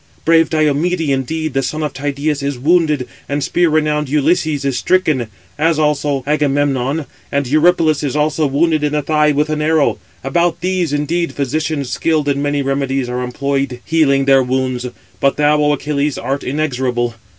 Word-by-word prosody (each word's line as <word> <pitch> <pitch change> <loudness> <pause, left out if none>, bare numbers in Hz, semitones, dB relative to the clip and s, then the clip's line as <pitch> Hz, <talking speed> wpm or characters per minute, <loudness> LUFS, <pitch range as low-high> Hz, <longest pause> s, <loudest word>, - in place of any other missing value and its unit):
Brave 165 0 +4
Diomede, 155 +2 +1
indeed, 155 +3 -2
the 135 - +1
son 155 +3 -3
of 150 - -3
Tydeus, 145 +1 -2
is 140 -1 -2
wounded, 150 -2 +2 0.2
and 145 0 -1
spear 175 -1 +2
renowned 150 -2 0
Ulysses 150 0 +1
is 135 -2 0
stricken, 155 - +1 0.3
as 160 0 +2
also 150 -3 0
Agamemnon; 145 -1 0 0.3
and 140 0 0
Eurypylus 155 +2 +3
is 145 -2 -2
also 150 0 +1
wounded 155 +2 +1
in 150 0 0
the 150 -1 0
thigh 150 0 +2
with 150 +2 0
an 155 0 -1
arrow. 155 -1 +2 0.2
About 170 +5 0
these, 180 -3 0
indeed, 160 +4 -1
physicians 145 -1 -2
skilled 155 0 0
in 140 0 0
many 145 0 0
remedies 135 -1 -1
are 125 0 -3
employed 135 0 -2
healing 140 -4 +2
their 135 -1 +5
wounds: 130 -1 -1 0.3
but 140 - +1
thou, 150 0 +3
O 150 0 +3
Achilles, 145 0 -1
art 135 +4 -3
inexorable. 125 -4 -1
145 Hz, 165 wpm, -17 LUFS, 135-155 Hz, 0.3 s, their